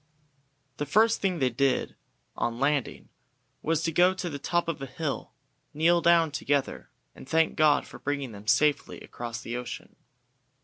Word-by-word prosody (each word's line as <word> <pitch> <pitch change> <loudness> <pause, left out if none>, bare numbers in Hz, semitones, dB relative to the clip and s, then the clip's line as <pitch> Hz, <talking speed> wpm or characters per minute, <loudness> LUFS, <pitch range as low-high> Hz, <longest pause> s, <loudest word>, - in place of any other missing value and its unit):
The 145 - -3
first 225 +2 +3
thing 190 -3 0
they 130 -4 +1
did 135 +1 0 0.4
on 120 0 -2
landing 140 -2 -1 0.5
was 165 -1 0
to 165 - 0
go 180 +3 +4
to 180 -2 -4
the 145 - -5
top 175 +4 0
of 165 -4 -3
a 135 - -5
hill, 140 +3 -4 0.4
kneel 170 +3 +3
down 170 -2 +4
together, 140 -1 -2 0.2
and 135 - -13
thank 160 0 +2
God 150 -2 +3
for - - -12
bringing 140 -3 -3
them 105 0 -12
safely 145 +5 +2
across 120 0 -7
the 120 - -5
ocean. 125 0 -7
145 Hz, 165 wpm, -27 LUFS, 130-165 Hz, 0.5 s, go